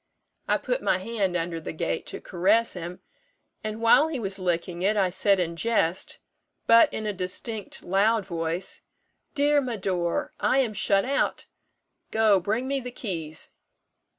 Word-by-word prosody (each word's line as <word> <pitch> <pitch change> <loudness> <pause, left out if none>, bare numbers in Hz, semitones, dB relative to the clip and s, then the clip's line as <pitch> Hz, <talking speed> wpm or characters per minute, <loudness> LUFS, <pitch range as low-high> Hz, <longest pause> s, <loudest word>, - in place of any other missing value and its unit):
I - - +3
put - - -2
my - - +2
hand 195 -2 -1
under 165 -1 -3
the - - -6
gate 165 +1 -3
to - - -5
caress 205 +6 +2
him; 175 0 -7 0.6
and 215 0 -4
while 230 +7 +5
he 320 -3 -3
was 195 -3 -4
licking 175 -1 -2
it, 205 +3 +2
I 190 -3 +2
said 195 +1 +3
in 170 -2 -1
jest, 185 -3 0 0.5
but 230 0 +6
in 220 - -4
a 210 - -1
distinct, 195 +3 -4
loud 205 +3 +2
voice, 170 0 -3 0.5
'Dear 290 0 +3
Médor, 190 -8 -1
I - - +2
am 250 -5 +2
shut 195 -1 +2
out 275 +2 0 0.6
go, 220 -3 +4
bring 220 +8 -1
me 275 0 0
the 250 -1 -6
keys.' 165 -10 -5
195 Hz, 155 wpm, -26 LUFS, 180-230 Hz, 0.6 s, but